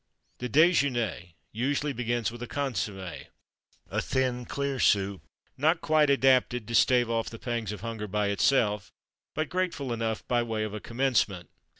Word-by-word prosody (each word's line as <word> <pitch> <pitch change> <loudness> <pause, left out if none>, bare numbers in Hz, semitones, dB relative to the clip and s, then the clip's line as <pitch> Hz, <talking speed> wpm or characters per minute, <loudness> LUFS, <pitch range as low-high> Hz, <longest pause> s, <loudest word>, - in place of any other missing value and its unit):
_" - - -47
The 125 - -3
déjeûner 125 - +2 0.2
usually 140 +5 -1
begins 120 -2 -1
with 120 0 -10
a 120 - -4
consommé, 105 -9 -4 0.6
a - - -1
thin, 125 -2 -1
clear, 140 0 -2
soup, 100 -3 +2 0.4
not 160 +5 +3
quite 155 -2 +3
adapted 130 -4 +3
to 115 - -5
stave 125 0 +4
off 115 -1 -1
the 115 - -9
pangs 115 -3 -3
of 105 - -7
hunger 115 -2 -4
by 105 0 0
itself, 105 -1 +2 0.4
but 155 0 -1
grateful 170 -8 -2
enough 115 -1 -3
by 120 -1 +2
way 110 -2 -2
of 110 -1 -4
a 105 - -4
commencement. 115 -7 0
120 Hz, 165 wpm, -28 LUFS, 110-135 Hz, 0.6 s, stave